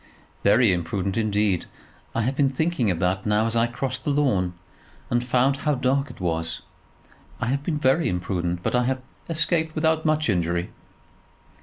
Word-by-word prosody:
"Very 105 0 +5
imprudent, 90 +3 -2
indeed. 105 -4 +1 0.5
I 115 - +1
have 130 +4 0
been 140 -1 +3
thinking 140 -4 0
of 90 - 0
that 90 +3 0
now 105 +1 +3
as 115 0 -1
I 115 0 +3
crossed 130 +1 -3
the - - -1
lawn, 120 -12 +1 0.6
and 120 0 +2
found 130 +2 +2
how 150 +1 0
dark 135 +2 +1
it - - -12
was. 80 -2 -2 0.8
I - - -1
have 140 +2 0
been 150 +1 -2
very 150 +3 +2
imprudent; 90 -1 -2
but - - -1
I 125 0 +3
have 130 0 -1 0.3
escaped 160 0 +1
without 160 0 +2
much 155 -1 +1
injury." 85 -3 0
120 Hz, 170 wpm, -24 LUFS, 95-140 Hz, 0.8 s, Very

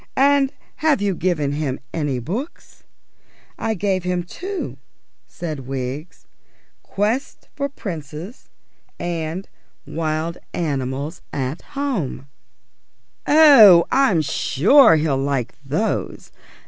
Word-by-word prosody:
And 275 0 +4 0.3
have 310 -4 +2
you 200 -1 0
given 170 -5 0
him 145 -3 -2
any 145 -5 -1
books?" 205 - -6 0.7
"I 225 -1 -1
gave 190 -1 -1
him 180 -1 -1
two," 375 - -6 0.5
said 155 -7 -6
Wiggs. 135 +5 -5 0.6
"Quests 220 +7 -2
for 280 -1 -2
Princes, 170 - -8 0.5
and 170 +2 -4 0.4
Wild 160 +1 -3 0.2
Animals 140 0 -3
at 135 +2 -3 0.2
Home." 240 - -2 1.0
"Oh, 240 - +8
I'm 255 - +3
sure 175 - +5
he'll 150 -3 +1
like 135 -4 -1
those. 155 +11 -2
170 Hz, 95 wpm, -21 LUFS, 145-225 Hz, 1.0 s, Oh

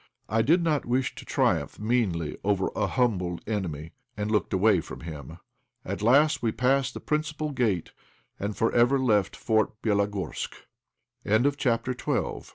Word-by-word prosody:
I 115 +2 +2
did 165 +9 +3
not 155 -4 +1
wish 125 +2 0
to - - -11
triumph - - 0
meanly 105 -9 0
over 100 -2 +1
a - - +1
humbled 90 -9 0
enemy, 85 -8 -3 0.3
and 105 +1 -2
looked 105 -2 +1
away 95 -1 +3
from - - -10
him. 75 -5 -8 0.5
At - - -4
last 140 +7 +4
we 115 - +1
passed 130 +2 +1
the - - -4
principal 150 0 -2
gate, 115 - 0 0.5
and 100 +1 -3
for 115 - +1
ever 120 +3 +4
left 105 -7 +2
Fort 110 -1 0
Bélogorsk. 100 -2 -1 1.0
CHAPTER 125 -2 0
XIII. - - -2
110 Hz, 150 wpm, -27 LUFS, 100-130 Hz, 1.0 s, last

